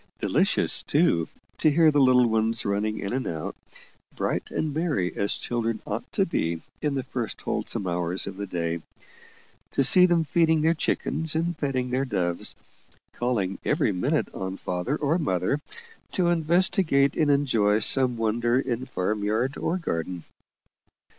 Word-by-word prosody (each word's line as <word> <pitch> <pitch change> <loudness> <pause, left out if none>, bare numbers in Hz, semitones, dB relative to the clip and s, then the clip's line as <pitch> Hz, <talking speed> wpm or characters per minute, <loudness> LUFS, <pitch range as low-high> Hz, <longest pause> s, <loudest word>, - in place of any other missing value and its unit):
Delicious, - - +2
too, 85 -1 +2 0.3
to 155 - +4
hear 155 +1 +5
the 145 - +2
little 130 -1 +5
ones 110 0 0
running 105 +2 -1
in 100 - -4
and 130 +1 -2
out, 80 -2 -4 0.6
bright - - -2
and 155 -2 -2
merry 145 - -1
as 100 - +1
children 115 -2 -2
ought - - -5
to - - +2
be 80 0 -2 0.2
in 150 -2 0
the 135 - -1
first 125 -3 -4
wholesome 100 - -2
hours 90 +1 -2
of 100 - -6
the 100 +1 -5
day 85 -2 -2 0.9
to 135 - +1
see 180 +7 +7
them 170 -2 +2
feeding 160 0 +2
their 160 +2 +3
chickens 160 -1 -1
and 170 +2 0
petting 130 -4 -2
their 130 +2 +1
doves 90 -9 -2 0.6
calling 110 -6 -1
every 150 -7 +1
minute 90 -2 -1
on 95 0 -5
father 90 +10 -2
or 155 +4 0
mother 95 - 0 0.5
to 180 -2 +2
investigate 170 -3 +2
and 155 -2 +2
enjoy 115 -8 +3
some 125 +2 +3
wonder 120 +2 +1
in 130 -2 -2
farm 105 -1 -2
yard 115 +7 0
or 180 - -1
garden. 85 - -3
125 Hz, 155 wpm, -26 LUFS, 100-150 Hz, 0.9 s, see